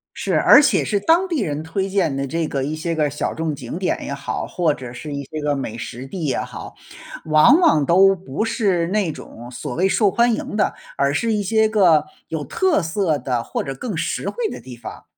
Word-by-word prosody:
是， - - -2
而 - - +8
且 290 - +2
是 205 - 0
当 335 - +3
地 330 -6 -1
人 150 -3 -3
推 190 +5 -2
荐 175 -8 0
的 135 0 -2
这 165 +3 -2
个 135 -1 -2
一 150 +2 -3
些 165 +1 -3
个 150 -2 +1
小 145 - -3
众 160 -2 -2
景 130 +5 -6
点 185 - 0
也 - - -5
好， 140 0 -4
或 165 -5 0
者 125 -2 -9
是 145 +3 -7
一 140 - -3
些 155 +3 -6
个 145 -1 0
美 120 -4 -5
食 125 +3 -7
地 170 +2 -5
也 135 - 0
好， - - -7 0.5
往 155 - +6
往 155 - +4
都 195 +4 +5
不 180 +2 -4
是 195 -7 0
那 195 -5 0
种 120 -3 -11
所 125 +1 -6
谓 190 +3 +2
受 205 0 +3
欢 235 +3 +3
迎 210 - -5
的， 210 - +1 0.2
而 140 0 +1
是 225 +8 0
一 210 -1 0
些 220 +2 +2
个 170 -8 +4 0.2
有 155 -3 -4
特 350 - +1
色 165 -2 0
的 125 -4 -2
或 - - -3
者 135 - -5
更 200 - -5
实 155 - -2
惠 475 -3 -2
的 - - -7
地 125 -2 -10
方。 - - -10
160 Hz, 245 characters per minute, -21 LUFS, 140-200 Hz, 0.5 s, 而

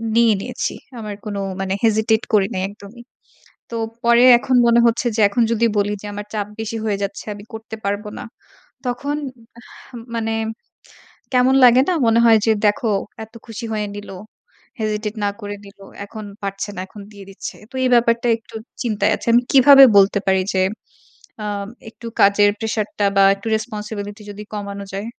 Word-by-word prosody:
নিয়ে 230 -1 +5
নিয়েছি। - - -3 0.3
আমার 210 -2 -6
কোন 210 -1 -4 0.3
মানে 190 0 -2
hesitate 220 0 +2
করি 205 -2 +4
নাই 185 - -2
একদমই। 205 +3 -13 0.7
তো 235 - -6 0.3
পরে 235 +1 +5
এখন 255 +2 0
মনে 235 0 +5
হচ্ছে 235 +2 0
যে 220 - +1
এখন 235 +3 +1
যদি 230 0 +2
বলি 205 0 +1
যে - - -10
আমার 205 0 -6
চাপ 205 -2 -2
বেশি 225 +1 -4
হয়ে 205 -2 0
যাচ্ছে 200 0 -5
আমি 205 0 -11
করতে 220 0 -8
পারব 200 +1 -1
না। - - -6 0.6
তখন 260 +4 -2 0.4
আহ 240 - -17 0.2
মানে 225 -1 -1 1.0
কেমন 255 +1 +4
লাগে 245 +1 +7
না? - - +3
মনে 230 0 +4
হয় 225 -1 +6
যে, 225 - +4
"দেখো 210 +3 +1 0.4
এত 220 - -21
খুশি 225 0 -7
হয়ে 210 -1 -2
নিল। 205 0 -9 0.7
hesitate 215 0 -3
না 205 - +1
করে 205 -1 -5
নিল। 200 0 -15 0.3
এখন 215 +1 -9 0.2
পারছে 195 +1 -4
না, - - -4
এখন 205 +1 -12
দিয়ে 200 -1 -12
দিচ্ছে।" 195 - -8
তো - - -24
এই - - +3
ব্যাপারটা 235 0 +2
একটু 225 - -20 0.3
চিন্তায় 220 -4 0
আছি। - - -11
আমি 240 +1 +5
কিভাবে 275 0 +9
বলতে 200 +1 +4
পারি 190 0 +3
যে 190 - +2 0.8
আম 205 -1 -3 0.2
একটু 230 - -12
কাজের 205 +1 +5
প্রেশার 220 -2 -2
টা 205 - +2
বা 195 - +6
একটু 200 +2 -14
রেসপন্সিবিলিটি 210 -1 -6
যদি 205 +1 -8
কমানো 200 -1 -5
যায়? 200 +2 -4
215 Hz, 175 wpm, -20 LUFS, 205-230 Hz, 1.0 s, কিভাবে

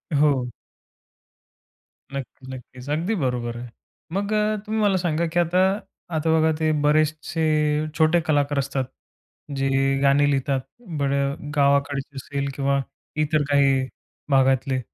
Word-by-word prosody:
हो. 140 -4 +3 1.7
नक्की, 135 -1 -7
नक्कीच. 125 +1 -10
अगदी 165 +9 0
बरोबर 120 -2 -1
आहे. 120 0 -7 0.4
मग 200 +2 -1 0.3
तुम्ही 220 +1 -1
मला 200 -2 +3
सांगा 170 -2 0
की 175 - +3
आता 175 +2 +2 0.6
आता 160 +1 0
बघा 160 0 +3
ते 155 -1 +2
बरेचसे 155 +2 +1 0.6
छोटे 160 +1 +4
कलाकार 145 -2 +2
असतात 135 -1 -1 0.7
जे 135 0 +1 0.3
गाणी 140 +1 +4
लिहितात 135 -1 0 0.4
बरं 140 +1 -1
गावाकडचे 140 -1 +1
असेल 140 +1 -3
किंवा 140 0 +1 0.4
इतर 150 0 +1
काही 135 -2 +3 0.4
भागातले. 135 -1 +3
140 Hz, 115 wpm, -23 LUFS, 135-155 Hz, 1.7 s, छोटे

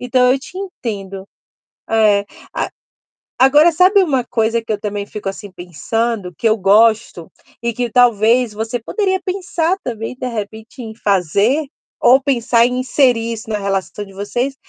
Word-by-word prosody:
Então 250 0 +3
eu 270 - 0
te 325 +7 -13
entendo. 200 - -6 0.6
É, 210 -2 +3 0.3
a - - -2 0.7
agora 295 +6 +5
sabe 370 +5 +5
uma 270 -7 0
coisa 230 -1 0
que 225 - -4
eu 210 - -2
também 205 -1 -4
fico, 205 -1 -7
assim, 200 +1 -7
pensando 185 +4 -3
que 225 - +2
eu 220 - +2
gosto 215 -2 +2 0.3
e 235 0 -1
que 245 -1 -2
talvez 235 0 +3
você 225 +3 -3
poderia 380 - -1
pensar 365 -2 -1
também, 225 0 -5
de 255 0 -5
repente, 220 +1 -7
em 220 -2 -7
fazer 205 - +1 0.4
ou 260 +3 +5
pensar 235 -3 +2
em 250 0 -2
inserir 245 -3 +1
isso 225 0 -8
na 210 - -1
relação 195 +1 -3
de 195 - -15
vocês? 240 +7 -3
230 Hz, 160 wpm, -17 LUFS, 205-255 Hz, 0.7 s, agora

